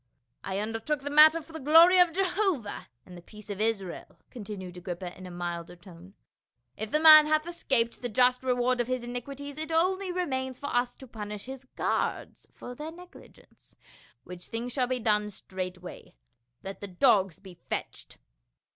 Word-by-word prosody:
" 120 - -50
I 190 0 -3
undertook 225 +7 -2
the 285 +1 -5
matter 310 +2 +7
for 325 - -17
the 320 - -6
glory 330 +6 +7
of 355 -1 +5
Jehovah 370 - -1 0.2
and 180 - -13
the 175 - -11
peace 210 +3 -12
of 200 +1 -5
Israel," 205 -5 -3
continued 200 -6 -8
Agrippa 180 0 -6
in 185 0 -10
a - - -9
milder 175 -1 -5
tone. 175 +1 -15 0.3
" 120 +1 -53
If 220 0 -5
the 305 - +1
man 310 -1 +9
hath 310 0 +1
escaped 265 -9 -1
the 245 - -3
just 250 +2 +3
reward 250 -1 +1
of 240 - -3
his 255 -1 -2
iniquities, 275 +4 -7
it 315 +1 -5
only 370 +3 +1
remains 260 -8 -3
for 285 -3 -5
us 245 0 0
to 265 - -13
punish 210 -2 -7
his 265 0 -9
guards - - -2
for 245 - -9
their 300 +5 -7
negligence; 360 +2 -16 0.5
which 180 -1 -10
thing 230 +2 -4
shall 250 0 0
be 255 0 -1
done 210 -2 +1
straightway. 185 - -8 0.5
Let 195 0 -8
the 200 - -5
dogs 190 - +2
be 190 -2 -13
fetched." - - -6
245 Hz, 180 wpm, -28 LUFS, 195-300 Hz, 0.5 s, man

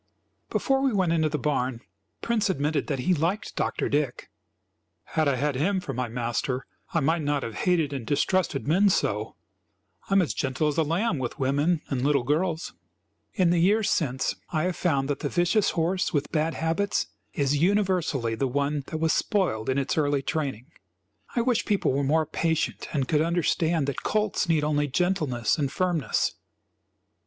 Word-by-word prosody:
Before 270 0 +1
we 270 -1 +2
went 185 -4 +2
into 160 -2 +2
the 150 - -1
barn, 130 -4 -1 0.4
Prince 220 -3 +1
admitted 150 -3 0
that 140 - -1
he 180 +8 +2
liked 175 +6 -1
Dr. - - -1
Dick. 145 -4 -1 0.7
"Had 155 -2 0
I 140 - +2
had 145 +3 0
him 190 +9 +1
for 140 -7 -5
my 125 0 -2
master 120 +2 -2 0.3
I 165 - +1
might 160 +4 +1
not 145 -1 0
have 115 - -5
hated 160 - +1
and 135 -4 -4
distrusted 145 +2 0
men 190 +7 +4
so. 190 - 0 0.7
I - - +1
am 195 - +6
as 160 - -2
gentle 135 +3 -1
as 150 - -1
a - - +4
lamb 165 +2 0
with 125 -2 -4
women 145 +5 +1
and 135 -3 -1
little 140 -1 +2
girls." 160 +5 -1 0.6
In 185 -6 +3
the 175 - +3
years 205 +5 +3
since, 130 -5 0 0.2
I 155 -2 0
have 180 -1 -1
found 140 -7 0
that 145 -1 -2
the - - -2
vicious 180 +4 +2
horse 180 +3 +1
with 145 -3 -1
bad 160 +1 0
habits 165 +5 0 0.3
is 140 0 +1
universally 180 - +1
the 120 +4 0
one 140 +3 0
that 160 - -4
was 160 0 +1
spoiled 155 - 0
in 130 - +1
its 140 +3 0
early 145 -2 +1
training. 135 -7 -2 0.7
I 240 - +3
wish 240 -1 +1
people 205 -10 +1
were 140 +1 0
more 155 +3 +2
patient 160 +1 -1
and 135 -4 -1
could 150 +1 +2
understand 165 -1 +1
that 140 -1 -3
colts 215 -4 0
need 160 -2 +3
only 145 -1 +1
gentleness 155 - 0
and 140 -2 0
firmness. 175 -6 0
155 Hz, 180 wpm, -26 LUFS, 140-180 Hz, 0.7 s, am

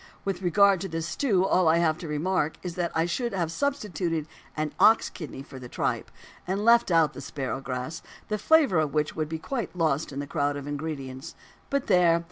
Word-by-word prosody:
With 195 -2 -2
regard 195 +1 +4
to 195 - -3
this 165 -2 -3
stew 190 - +1
all 185 -2 +3
that 160 - +5
I - - +3
have 165 -1 +2
to 170 - -6
remark 155 +1 0
is 180 -2 -4
that 175 0 -2
I 160 +1 +2
should 235 +6 -2
have 170 -4 -1
substituted 180 - -1 0.3
an 155 -1 -2
ox 220 +1 +5
kidney 150 -5 -8
for 135 -1 -11
the 125 -1 -9
tripe, - - -2 0.4
and 195 +3 -1
left 235 -1 +5
out 165 -4 +3
the - - -8
"sparrowgrass," 135 +2 -4 0.3
the 210 0 -2
flavour 280 - +4
of 155 -1 -1
which 150 0 0
would 155 -1 -2
be 160 - -3
quite 235 - -4
lost 160 -4 0
in 135 - -7
the 145 - -3
crowd 145 -1 -1
of 140 - -7
ingredients. 145 -3 -5 0.3
But 280 -1 0
there! 175 -4 +4
165 Hz, 210 wpm, -27 LUFS, 150-190 Hz, 0.4 s, that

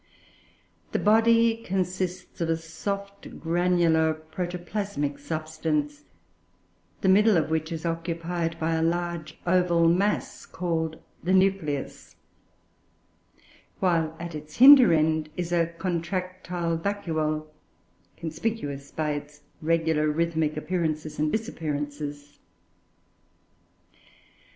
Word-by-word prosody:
The - - +2
body 225 +1 +4
consists 185 -3 -3
of 165 - 0
a 165 - +2
soft 200 +5 -6
granular 165 -2 +2
protoplasmic 175 -1 -4
substance, 155 -3 -3 1.0
the - - +1
middle 205 +1 +5
of 155 -1 0
which 160 +1 -1
is 165 0 -4
occupied 165 0 -2
by 160 +1 0
a 160 - +1
large 170 -1 -2
oval 175 -2 +3
mass 195 +5 0
called 160 -2 -2 0.2
the 180 +3 +1
"nucleus"; 190 -7 0 1.6
while, 165 -3 +1
at 170 0 -6
its 150 0 -8
hinder 260 -4 +9
end, 155 -1 +2
is 175 -1 -3
a 170 -1 +2
"contractile 175 0 -3
vacuole," 160 -5 -2 0.7
conspicuous 155 -5 -4
by 155 -1 -2
its 145 0 -7 0.2
regular 160 -1 +1
rhythmic 160 -1 0
appearances 155 -3 -2
and 155 0 +1
disappearances. 145 -8 -4
165 Hz, 100 wpm, -26 LUFS, 155-180 Hz, 1.6 s, hinder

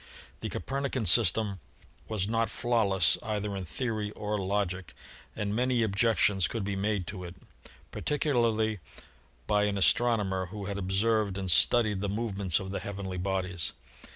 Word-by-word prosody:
The - - -4
Copernican 135 -3 -2
system 100 +1 +4 0.5
was 105 -3 -1
not 115 +1 +1
flawless 100 -8 +2
either 105 -2 -3
in 95 -1 -4
theory 110 - -2
or 105 0 -3
logic 95 -3 -2 0.4
and 105 0 -2
many 125 0 +2
objections 100 -2 +2
could 115 -3 -3
be 100 0 -2
made 100 -1 -1
to 90 +1 -7
it, 85 0 -8 0.6
particu 150 0 -1
larly 110 -3 +1 0.7
by 105 0 +2
an 100 -1 -1
astronomer 100 -3 +2
who 100 +2 -7
had 100 0 -3
observed 100 +1 +1
and 95 -2 -1
studied 105 0 +3
the 100 - -1
movements 100 -4 0
of 95 -1 -6
the 100 - -2
heavenly 95 -2 -5
bodies. 95 -2 -1
100 Hz, 150 wpm, -29 LUFS, 95-110 Hz, 0.7 s, system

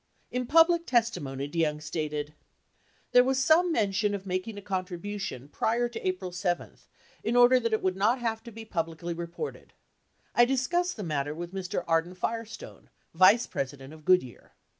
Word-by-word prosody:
In 250 -1 -2
public 330 +3 +5
•testimony, 170 - 0
DeYoung 150 -1 0
stated: 150 -1 -4 0.8
There 245 - +7
was 265 +1 +1
some 325 +6 +4
mention 205 -5 +1
of 195 -1 -7
making 185 +3 -3
a - - -6
contribution 185 -6 -4
prior 230 +10 0
to 235 -1 -7
April 185 0 -2
7 175 -1 -2 0.5
in 230 - 0
order 245 +1 +7
that 230 -2 -1
it 220 - 0
would 185 -1 +1
not 215 +6 +2
have 225 -2 -2
to 235 - -8
be 225 0 -9
publicly 170 -3 -3
re 170 0 -5
ported 310 - -7 0.6
I 240 - +6
discussed 335 +8 0
the 210 - -4
matter 150 -3 -2
with 175 +2 -7
Mr. 190 -2 -3
Arden 165 +2 +1
Firestone, 230 - -5 0.2
vice 185 +7 +6
president 135 +1 -5
of 155 -1 -14
Goodyear. 165 -9 +1
195 Hz, 165 wpm, -28 LUFS, 165-240 Hz, 0.8 s, There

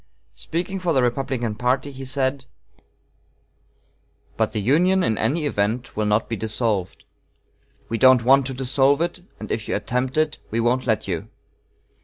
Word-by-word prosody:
Speaking 180 +4 -4
for 175 -2 0
the 130 -3 +3
Republican 120 -2 -1
party, 125 +5 -1
he 135 0 -8
said: 130 0 -1 1.9
"But - - 0
the - - -2
Union 175 - +3
in 110 - +1
any 145 +10 0
event 115 -1 -1
will 105 0 0
not 105 +1 +1
be 115 - -3
dissolved. 110 -3 -2 0.8
We 115 - -3
don't 130 -3 +6
want 135 +1 +5
to 135 - -5
dissolve 135 +2 +2
it, 175 +1 -2 0.2
and 110 - -7
if 110 - -2
you - - -1
attempt 125 +6 -2
it, 155 -1 +1
we 115 - -1
won't 125 +3 +1
let 110 -2 0
you. 85 -4 -4
130 Hz, 160 wpm, -22 LUFS, 110-140 Hz, 1.9 s, don't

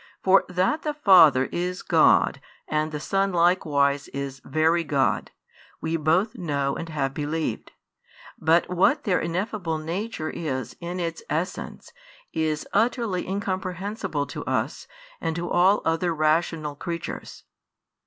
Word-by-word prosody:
For 195 +1 +5
that 185 - +1
the 300 -1 -3
Father 170 - +6
is 180 +1 -3
God - - +4 0.3
and 155 0 -1
the 150 - -4
Son 195 +5 0
likewise 150 -5 +2
is 135 -1 -6
Very 160 +2 +2
God, 140 -4 0 0.5
we 160 +1 -2
both 165 +8 +2
know 145 - -1
and 165 - -6
have 135 -4 -2
believed: 150 -4 -3 0.7
but 165 +2 +3
what 195 - +2
their 195 -6 +2
ineffable 175 0 -2
Nature 165 +2 -4
is 130 -7 -4
in 175 +1 -5
its 165 -2 -3
Essence 165 +5 -4 0.4
is 155 -1 -1
utterly 220 -3 +1
incomprehensible 190 -3 -3
to - - -7
us - - -2 0.3
and 160 - -1
to 175 0 -4
all 185 +4 +4
other 165 +1 +1
rational 155 -1 +1
creatures. 170 +3 -6
170 Hz, 130 wpm, -25 LUFS, 155-185 Hz, 0.7 s, Father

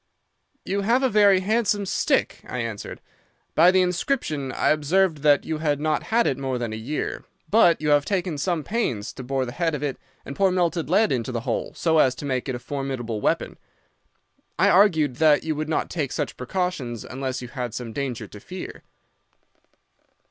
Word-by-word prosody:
"'You 200 +2 -1
have 235 +6 +2
a 260 - +3
very 200 -3 +5
handsome 210 0 +1
stick,' - - 0
I 125 - -4
answered. 115 -4 -5 0.5
'By 170 +3 +6
the 185 0 +4
inscription 180 - -1
I - - +1
observed 155 +2 +2
that 145 -1 +3
you 160 -1 -3
had 150 -2 0
not 155 0 0
had 235 +1 +3
it 135 - 0
more 135 -2 -2
than 120 -2 -3
a - - -3
year. 125 +8 -4 0.3
But 180 -6 +5
you 150 0 -1
have 145 -1 +4
taken 180 -4 -2
some 170 -1 -1
pains 130 - -2
to 130 - -8
bore 135 +1 -1
the 120 - -6
head 165 +2 -1
of 145 - -5
it 140 -3 -3 0.3
and 140 - -7
pour 195 +3 +3
melted 175 -3 0
lead 210 +5 +3
into 125 -1 -1
the 120 -2 -3
hole - - -3
so 160 -2 +2
as 130 -3 +4
to 145 - -7
make 130 -1 -2
it 130 - -1
a - - -3
formidable 125 -4 -4
weapon. - - -1 1.0
I 195 +3 +4
argued 160 -9 +4
that 155 -1 +4
you 160 - -1
would 155 +1 -4
not 160 - -1
take 150 -6 -2
such - - -3
precautions 130 - -3
unless 130 -1 -4
you 125 - -8
had 125 -4 -5
some 120 -3 -6
danger 130 -5 -3
to 105 - -11
fear. 185 - -8
150 Hz, 195 wpm, -24 LUFS, 130-185 Hz, 1.0 s, By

